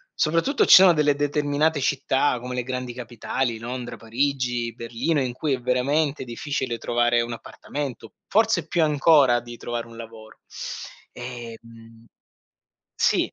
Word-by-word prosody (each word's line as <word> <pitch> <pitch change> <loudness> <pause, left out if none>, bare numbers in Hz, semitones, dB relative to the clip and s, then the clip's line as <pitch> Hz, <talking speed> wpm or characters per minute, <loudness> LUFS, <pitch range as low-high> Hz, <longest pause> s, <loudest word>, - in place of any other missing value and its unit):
Soprattutto, 165 - +2
ci - - +7
sono 185 -2 +8
delle 150 -2 +3
determinate 145 +1 +1
città 135 -1 +1
come 125 0 -5
le 125 - -1
grandi 125 -1 -4
capitali, 120 0 -3
Londra, 120 +1 -6
Parigi, 120 0 -1
Berlino, 120 +7 -1
in 125 -2 -2
cui 145 +2 -1
è 130 - -1
veramente 140 +4 0
difficile 125 0 -3
trovare 120 0 +2
un 115 0 -4
appartamento, 125 -1 -7
forse 220 -6 +2
più 170 +1 0
ancora 145 -4 +4
di 120 0 -10
trovare 120 0 -4
un 115 0 -13
lavoro 110 -1 -11 0.7
ehm 115 -2 -10 0.9
sì. - - +1
125 Hz, 135 wpm, -24 LUFS, 120-145 Hz, 0.9 s, sono